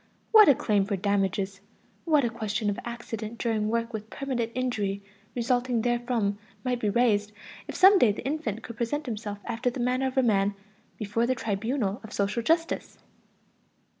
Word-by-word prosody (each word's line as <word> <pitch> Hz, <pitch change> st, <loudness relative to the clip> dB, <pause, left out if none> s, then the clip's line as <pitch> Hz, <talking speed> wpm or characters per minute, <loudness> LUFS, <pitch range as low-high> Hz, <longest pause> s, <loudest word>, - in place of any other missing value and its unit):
What 435 Hz, -6 st, +9 dB
a 280 Hz, -, +7 dB
claim 205 Hz, -4 st, +1 dB
for 200 Hz, 0 st, -1 dB
damages, 195 Hz, 0 st, -1 dB, 0.4 s
what 305 Hz, -4 st, +4 dB
a -, -, +1 dB
question 215 Hz, -2 st, -1 dB
of 205 Hz, -, -4 dB
accident 235 Hz, -2 st, -6 dB
during 220 Hz, -3 st, 0 dB
work 230 Hz, +1 st, -1 dB
with 215 Hz, 0 st, -6 dB
permanent 245 Hz, -4 st, -3 dB
injury 210 Hz, -6 st, -1 dB, 0.3 s
resulting 245 Hz, -1 st, +1 dB
therefrom 240 Hz, -4 st, 0 dB, 0.2 s
might 250 Hz, -1 st, -1 dB
be 215 Hz, -, 0 dB
raised 210 Hz, -2 st, +2 dB, 0.4 s
if -, -, -6 dB
some 385 Hz, +1 st, +7 dB
day 230 Hz, -, +5 dB
the 205 Hz, -, -7 dB
infant 275 Hz, -7 st, -2 dB
could 235 Hz, -, -9 dB
present 290 Hz, +6 st, -2 dB
himself 210 Hz, -4 st, -4 dB
after 235 Hz, +2 st, -1 dB
the 245 Hz, -, -6 dB
manner 255 Hz, +2 st, +1 dB
of 260 Hz, -, -5 dB
a 265 Hz, -, +5 dB
man 200 Hz, -3 st, +2 dB, 0.4 s
before 220 Hz, +3 st, 0 dB
the 255 Hz, -, +1 dB
tribunal 220 Hz, 0 st, -2 dB
of 220 Hz, -, -10 dB
social 200 Hz, +4 st, 0 dB
justice! 330 Hz, +7 st, 0 dB
230 Hz, 170 wpm, -27 LUFS, 205-250 Hz, 0.4 s, What